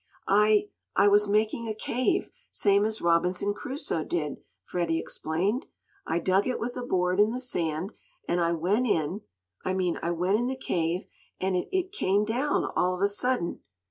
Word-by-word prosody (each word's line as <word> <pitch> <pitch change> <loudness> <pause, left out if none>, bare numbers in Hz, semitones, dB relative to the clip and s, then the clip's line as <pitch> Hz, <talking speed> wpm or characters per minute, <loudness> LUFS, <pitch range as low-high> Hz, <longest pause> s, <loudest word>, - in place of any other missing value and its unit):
"I 210 +1 +4 0.3
I 200 - +5
was 205 0 +5
making 215 +2 +1
a 215 - -2
cave, 245 +3 0 0.2
same 200 0 +3
as 220 0 -2
Robinson 180 +4 +2
Crusoe 260 - -3
did," 150 -4 -2 0.3
Freddie 170 -2 -1
explained. 180 - -1 0.4
"I - - +1
dug 190 +4 +2
it 255 - -1
with 245 +2 -3
a 250 - -4
board 185 -5 0
in 210 +1 +6
the 245 +3 -3
sand, 175 - -2 0.3
and 175 0 +1
I 170 0 +2
went 195 +10 +1
in 175 +1 0 0.4
I 185 - -1
mean, 180 -2 0
I 170 - -1
went 180 +5 +1
in 240 - 0
the 260 0 -2
cave, 175 -6 -1 0.3
and 190 0 0
it 180 - -1
it 375 0 0
came 205 - +1
down 255 +7 0
all 180 0 +2
of 180 - -7
a 200 - +5
sudden." 205 -2 -1
200 Hz, 180 wpm, -28 LUFS, 175-225 Hz, 0.4 s, in